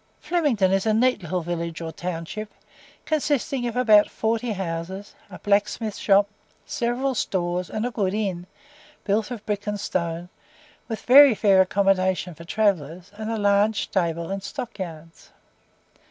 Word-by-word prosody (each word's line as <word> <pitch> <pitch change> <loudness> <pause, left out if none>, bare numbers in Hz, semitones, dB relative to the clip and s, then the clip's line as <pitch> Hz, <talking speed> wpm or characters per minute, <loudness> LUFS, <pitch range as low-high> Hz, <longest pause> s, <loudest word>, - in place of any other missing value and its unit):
Flemington 290 - +1
is 195 +2 +1
a 215 - +3
neat 250 -1 +2
little 180 +1 -2
village 170 -1 -4
or 165 -1 -5
town 165 0 -5
ship, 215 +5 -7 0.5
consisting 285 -4 0
of 235 - -4
about 215 -4 +5
forty 225 +1 -1
houses, 190 +1 -5 0.2
a - - -9
blacksmith's 210 +1 0
shop, 200 0 +4 0.4
several 245 +3 -1
stores, 180 -5 -2
and 215 +1 -3
a 250 - -2
good 200 -3 -1
inn, 190 -5 -3 0.6
built 210 +2 0
of 235 -4 -7
brick 210 0 -3
and 205 0 -2
stone, 170 -3 -3 0.6
with 225 -2 -5
very 270 -1 +8
fair 195 -2 +5
accommodation 190 -1 +1
for 165 +1 -12
travellers, 180 -3 -1
and 215 +1 -6
a 225 - -1
large 205 +1 +2
stable 170 -2 -2
and 195 0 -3
stock 240 +1 -7
yards. 165 -2 -8
200 Hz, 155 wpm, -24 LUFS, 180-220 Hz, 0.6 s, very